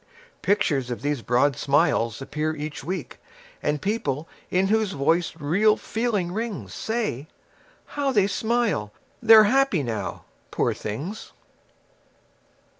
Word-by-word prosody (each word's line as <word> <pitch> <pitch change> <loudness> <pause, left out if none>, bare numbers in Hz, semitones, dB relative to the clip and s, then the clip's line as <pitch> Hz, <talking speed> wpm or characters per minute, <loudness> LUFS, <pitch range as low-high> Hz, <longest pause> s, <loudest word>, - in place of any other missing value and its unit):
Pictures 145 -10 +1
of 120 +1 -5
these 145 -3 -1
broad 125 +4 +2
smiles 140 -5 +1
appear 155 +3 -2
each 150 0 -6
week, 185 +2 -5 0.4
And 150 0 0
people 165 - -2 0.2
in 190 +1 +2
whose 215 -2 +1
voice 160 +4 +1
real 190 +9 +3
feeling 215 -6 -1
rings 220 +1 -4
Say: 215 - -2 0.6
How 285 -2 -1
they 205 -6 +3
smile! 205 - 0 0.3
They're 225 -2 +9
happy 255 - +3
now, 115 -4 -4 0.2
poor - - 0
things. 145 - -6
175 Hz, 115 wpm, -24 LUFS, 145-215 Hz, 0.6 s, They're